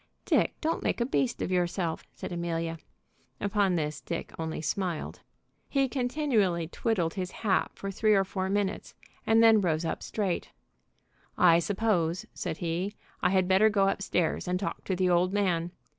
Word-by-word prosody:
"Dick, -, -, +2 dB
don't 325 Hz, +1 st, 0 dB
make -, -, -1 dB
a 235 Hz, -, +2 dB
beast 255 Hz, -1 st, 0 dB
of -, -, -3 dB
yourself!" 175 Hz, -2 st, -1 dB
said -, -, -7 dB
Amelia. 165 Hz, -1 st, -2 dB, 0.6 s
Upon 200 Hz, -2 st, +1 dB
this 150 Hz, -2 st, -2 dB
Dick 170 Hz, -, -5 dB
only 160 Hz, -1 st, -3 dB
smiled. 170 Hz, +2 st, -3 dB, 0.5 s
He 275 Hz, -1 st, +2 dB
continually 245 Hz, -, 0 dB
twiddled 175 Hz, -3 st, -1 dB
his 185 Hz, -3 st, -3 dB, 0.2 s
hat 195 Hz, -3 st, +2 dB
for 195 Hz, -, -5 dB
three 215 Hz, +2 st, +3 dB
or 195 Hz, -, +4 dB
four 190 Hz, 0 st, -3 dB
minutes, 205 Hz, 0 st, -2 dB, 0.3 s
and 225 Hz, +1 st, +5 dB
then 225 Hz, -2 st, +7 dB
rose 165 Hz, -3 st, 0 dB
up -, -, -2 dB
straight. 195 Hz, -5 st, -2 dB, 0.9 s
"I 170 Hz, -2 st, +6 dB
suppose," 180 Hz, -3 st, 0 dB
said 155 Hz, -, -4 dB
he, 175 Hz, +4 st, -2 dB, 0.3 s
"I -, -, +3 dB
had 185 Hz, -1 st, +2 dB
better 190 Hz, +3 st, +5 dB
go 195 Hz, -2 st, +3 dB
up 195 Hz, -, -2 dB
stairs 180 Hz, -4 st, 0 dB
and 180 Hz, 0 st, 0 dB
talk 195 Hz, -, -4 dB
to 190 Hz, -, 0 dB
the 185 Hz, 0 st, +1 dB
old 180 Hz, +2 st, +3 dB
man. 175 Hz, -5 st, +1 dB
185 Hz, 170 wpm, -29 LUFS, 170-205 Hz, 0.9 s, then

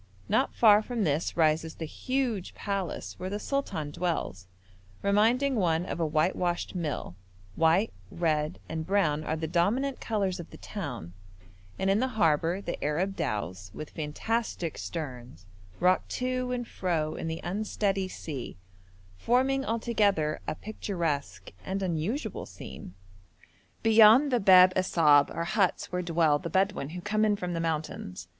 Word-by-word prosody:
Not -, -, +1 dB
far 210 Hz, -2 st, +6 dB
from 230 Hz, 0 st, -2 dB
this 155 Hz, 0 st, 0 dB
rises 160 Hz, 0 st, +2 dB
the 165 Hz, -, -5 dB
huge 245 Hz, -, -2 dB
palace 195 Hz, -3 st, -4 dB
where 185 Hz, -, -4 dB
the 205 Hz, -, -2 dB
sultan 200 Hz, -, -3 dB
dwells, 145 Hz, -, -3 dB, 0.6 s
reminding 230 Hz, +7 st, +3 dB
one 175 Hz, -5 st, +1 dB
of -, -, -4 dB
a 165 Hz, -, +1 dB
whitewashed 175 Hz, +3 st, 0 dB
mill; 155 Hz, -, -3 dB, 0.4 s
white, 165 Hz, +7 st, +3 dB, 0.2 s
red, 160 Hz, -2 st, 0 dB
and 160 Hz, 0 st, -3 dB
brown 160 Hz, -5 st, +1 dB
are 155 Hz, -, -1 dB
the 160 Hz, 0 st, -3 dB
dominant 210 Hz, -, +1 dB
colours 200 Hz, -5 st, -1 dB
of 170 Hz, -, -8 dB
the -, -, -12 dB
town, 125 Hz, -, -6 dB, 0.6 s
and 190 Hz, -, -1 dB
in 195 Hz, +2 st, +3 dB
the 260 Hz, -, +1 dB
harbour 165 Hz, +1 st, +2 dB
the 175 Hz, -, -5 dB
Arab 175 Hz, +7 st, 0 dB
dhows, 95 Hz, -, -3 dB
with 155 Hz, -, -7 dB
fantastic 170 Hz, +3 st, -2 dB
sterns, 125 Hz, -, -7 dB, 0.3 s
rock 185 Hz, +1 st, +3 dB
to 255 Hz, 0 st, -2 dB
and 245 Hz, -1 st, -3 dB
fro 160 Hz, -4 st, -1 dB
in -, -, -5 dB
the 160 Hz, 0 st, -3 dB
unsteady 195 Hz, +1 st, -1 dB
sea, 145 Hz, -, -7 dB, 0.6 s
forming 265 Hz, -, +2 dB
altogether 210 Hz, -, +1 dB
a -, -, -2 dB
picturesque 170 Hz, -8 st, -3 dB
and 195 Hz, +1 st, -3 dB
unusual 190 Hz, -, -2 dB
scene. 90 Hz, -, -10 dB, 0.9 s
Beyond 225 Hz, +5 st, +7 dB
the 245 Hz, -, +3 dB
Bab 185 Hz, -2 st, +7 dB
Assab 155 Hz, -6 st, +4 dB
are -, -, -3 dB
huts 195 Hz, +1 st, 0 dB
where 180 Hz, 0 st, -1 dB
dwell 165 Hz, -4 st, +2 dB
the 170 Hz, -, -5 dB
Bedouin 190 Hz, -4 st, 0 dB
who 175 Hz, +2 st, -6 dB
come 215 Hz, +2 st, +2 dB
from 180 Hz, -3 st, -4 dB
the 165 Hz, -, -2 dB
mountains. 155 Hz, -, -3 dB
180 Hz, 145 wpm, -28 LUFS, 155-210 Hz, 0.9 s, Beyond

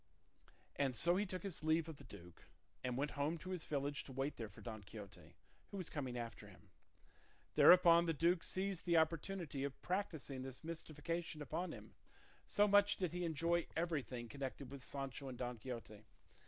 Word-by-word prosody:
And 135 Hz, -3 st, +1 dB
so 170 Hz, +9 st, +4 dB
he 205 Hz, +2 st, +1 dB
took 185 Hz, +1 st, -4 dB
his 195 Hz, -6 st, -3 dB
leave 160 Hz, +1 st, +3 dB
of 160 Hz, -3 st, -7 dB
the -, -, -12 dB
duke, 85 Hz, 0 st, -13 dB, 0.4 s
and 125 Hz, -1 st, -1 dB
went 145 Hz, +2 st, 0 dB
home 145 Hz, +4 st, 0 dB
to 185 Hz, +3 st, -7 dB
his 180 Hz, -4 st, -3 dB
village 145 Hz, -1 st, -1 dB
to -, -, -8 dB
wait 135 Hz, +3 st, -1 dB
there 110 Hz, -3 st, -5 dB
for 100 Hz, -, -14 dB
Don 110 Hz, -3 st, -6 dB
Quixote, 100 Hz, 0 st, -11 dB, 0.3 s
who 200 Hz, -, -6 dB
was 185 Hz, -4 st, -5 dB
coming 130 Hz, -5 st, -3 dB
after 115 Hz, -3 st, -5 dB
him. -, -, -17 dB, 0.8 s
Thereupon 170 Hz, -1 st, +8 dB
the 165 Hz, -, +2 dB
duke 170 Hz, +3 st, +3 dB
seized 190 Hz, -1 st, -2 dB
the 170 Hz, -1 st, +5 dB
opportunity 160 Hz, -2 st, 0 dB
of 140 Hz, -1 st, -3 dB
practising 160 Hz, -8 st, -2 dB
this 130 Hz, +2 st, -7 dB
mystification 165 Hz, 0 st, -4 dB
upon 160 Hz, +6 st, -2 dB
him; -, -, -10 dB, 0.5 s
so 205 Hz, 0 st, +4 dB
much 205 Hz, 0 st, +5 dB
did 180 Hz, -4 st, 0 dB
he 180 Hz, +1 st, -2 dB
enjoy 170 Hz, +1 st, +1 dB
everything 140 Hz, -8 st, -1 dB
connected 135 Hz, +1 st, -5 dB
with 140 Hz, -2 st, -8 dB
Sancho 135 Hz, 0 st, -4 dB
and 125 Hz, -, -6 dB
Don 125 Hz, -1 st, -3 dB
Quixote. 115 Hz, -3 st, -7 dB
150 Hz, 180 wpm, -40 LUFS, 130-170 Hz, 0.8 s, Thereupon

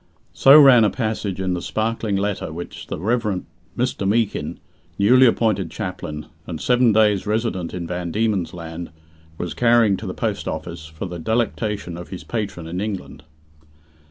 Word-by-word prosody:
So 140 Hz, +3 st, +8 dB
ran 130 Hz, -5 st, +8 dB
a 105 Hz, -, +4 dB
passage 110 Hz, -5 st, -3 dB
in 95 Hz, -1 st, -1 dB
the 90 Hz, -, -3 dB
sparkling 110 Hz, 0 st, -1 dB
letter 100 Hz, -4 st, -2 dB
which 85 Hz, +2 st, -8 dB
the -, -, -4 dB
Rev. 105 Hz, +1 st, -1 dB, 0.3 s
Mr. 120 Hz, -5 st, -1 dB
Meekin, 110 Hz, 0 st, 0 dB, 0.4 s
newly 125 Hz, +6 st, +6 dB
appointed 105 Hz, -6 st, +1 dB
chaplain, 75 Hz, -4 st, -5 dB, 0.2 s
and 80 Hz, -3 st, -5 dB
seven 125 Hz, +2 st, +3 dB
days' 105 Hz, -2 st, +3 dB
resident 105 Hz, -5 st, -1 dB
in 90 Hz, -2 st, -5 dB
Van 90 Hz, 0 st, -4 dB
Diemen's 105 Hz, -4 st, 0 dB
Land, 85 Hz, 0 st, -7 dB, 0.5 s
was 90 Hz, -1 st, -4 dB
carrying 115 Hz, -4 st, +4 dB
to -, -, -7 dB
the -, -, -5 dB
post -, -, -2 dB
office, 80 Hz, 0 st, -5 dB
for 80 Hz, +3 st, -7 dB
the 90 Hz, -1 st, -6 dB
delectation 105 Hz, -3 st, -1 dB
of 85 Hz, -, -9 dB
his 95 Hz, -, -7 dB
patron 100 Hz, -7 st, -4 dB
in 90 Hz, +3 st, -4 dB
England. 100 Hz, -7 st, -5 dB
100 Hz, 160 wpm, -22 LUFS, 85-115 Hz, 0.5 s, So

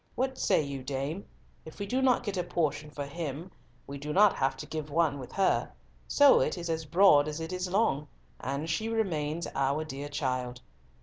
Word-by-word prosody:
What 260 Hz, +1 st, -1 dB
say 185 Hz, -6 st, +3 dB
you, 140 Hz, -2 st, -5 dB
dame? 140 Hz, +7 st, -4 dB, 0.4 s
If 160 Hz, -, -12 dB
we 200 Hz, -, -3 dB
do 255 Hz, +6 st, 0 dB
not 255 Hz, -2 st, +3 dB
get 205 Hz, -4 st, -3 dB
a 180 Hz, -, 0 dB
portion 150 Hz, -3 st, -1 dB
for 145 Hz, -1 st, -5 dB
him, 160 Hz, +3 st, -5 dB, 0.3 s
we 140 Hz, 0 st, -7 dB
do 150 Hz, +2 st, -5 dB
not 205 Hz, +2 st, +6 dB
have 135 Hz, 0 st, 0 dB
to -, -, -7 dB
give 155 Hz, -1 st, -5 dB
one 150 Hz, -2 st, +1 dB
with 130 Hz, -, -9 dB
her, 195 Hz, -1 st, +1 dB, 0.3 s
so 285 Hz, -1 st, +6 dB
it -, -, 0 dB
is 170 Hz, -1 st, -3 dB
as 160 Hz, 0 st, -2 dB
broad 150 Hz, -2 st, +5 dB
as 150 Hz, +1 st, -4 dB
it 160 Hz, +2 st, -5 dB
is 180 Hz, 0 st, -2 dB
long, 180 Hz, -7 st, +1 dB, 0.3 s
and 140 Hz, +4 st, -3 dB
she 220 Hz, +7 st, -1 dB
remains 170 Hz, -8 st, -1 dB
our 140 Hz, +3 st, 0 dB
dear 145 Hz, -1 st, -6 dB
child. 130 Hz, -4 st, -2 dB
155 Hz, 200 wpm, -29 LUFS, 140-185 Hz, 0.4 s, not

